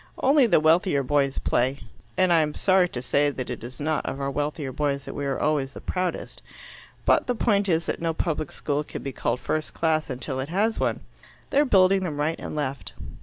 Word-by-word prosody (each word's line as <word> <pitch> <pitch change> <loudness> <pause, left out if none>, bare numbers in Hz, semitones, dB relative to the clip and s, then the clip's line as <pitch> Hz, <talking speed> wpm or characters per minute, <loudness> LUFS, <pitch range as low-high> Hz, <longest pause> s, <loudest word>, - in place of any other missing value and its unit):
Only 275 -1 +4
the 185 - +5
wealthier 160 -1 +3
boys 140 0 +1
play 130 +3 +1 0.4
and 185 -2 +4
I'm 155 -2 +2
sorry 185 -2 +3
to 125 -4 -6
say 145 +3 +2
that 130 -3 -5
it 120 - -6
is 125 +2 -9
not 155 +1 0
of 135 - -4
our 140 0 -2
wealthier 145 -1 -2
boys 140 0 -1
that - - -6
we 145 -1 -3
are 135 - -1
always 145 -3 0
the - - -8
proudest. 180 -2 -3 0.6
But - - +3
the 245 - 0
point 205 -3 +2
is 165 -1 +2
that - - -3
no 165 -1 +1
public 155 -2 -2
school 145 0 -2
can - - -8
be 135 - -3
called 125 - -1
first 155 +3 -3
class 160 -2 +1
until 130 +1 -4
it 135 +3 -4
has 210 +6 +1
one. - - 0 0.5
They 275 - +3
are 295 - +5
building 190 -5 +4
them 155 -5 -3
right 155 +3 0
and - - -6
left." 140 -2 -3
150 Hz, 220 wpm, -25 LUFS, 140-180 Hz, 0.6 s, the